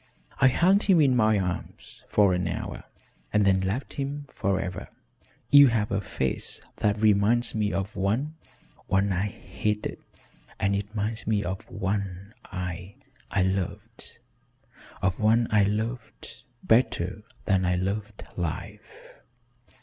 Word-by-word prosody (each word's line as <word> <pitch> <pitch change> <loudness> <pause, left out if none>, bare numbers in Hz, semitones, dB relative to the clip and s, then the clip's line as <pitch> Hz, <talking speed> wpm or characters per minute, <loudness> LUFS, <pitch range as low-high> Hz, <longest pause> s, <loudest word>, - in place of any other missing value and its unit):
I 135 - +6
held 185 +10 +4
him 190 -6 +4
in 135 -4 +4
my 110 -3 +4
arms 90 -3 -5
for 100 -3 +4
an 90 0 0
hour - - -5 0.5
and 105 -1 +3
then 95 -1 +4
left 100 +8 -2
him 140 +1 -4
forever. 95 -2 -2 0.6
You 145 -1 +9
have 110 -3 0
a 100 0 0
face 65 -8 -2 0.2
that 105 0 +1
reminds 110 +3 +3
me 105 -2 0
of 95 +2 -3
one 115 +11 0 0.5
one 95 +1 +2
I 95 +3 0
hated 105 +1 -3 0.6
and 100 +1 +1
it 100 +2 -4
minds 110 +2 -3
me 105 -2 +1
of 95 +1 -5
one 100 0 -3
I 90 +1 -6 0.3
I 100 - +1
loved, 100 +4 -3 0.9
of 90 0 +1
one 115 +2 +4
I 105 -2 +5
loved 115 +3 -4 0.2
better 110 -5 +2 0.2
than 95 -2 +2
I 90 0 +2
loved 100 +3 -3
life." 85 -3 -6
105 Hz, 135 wpm, -27 LUFS, 95-115 Hz, 0.9 s, You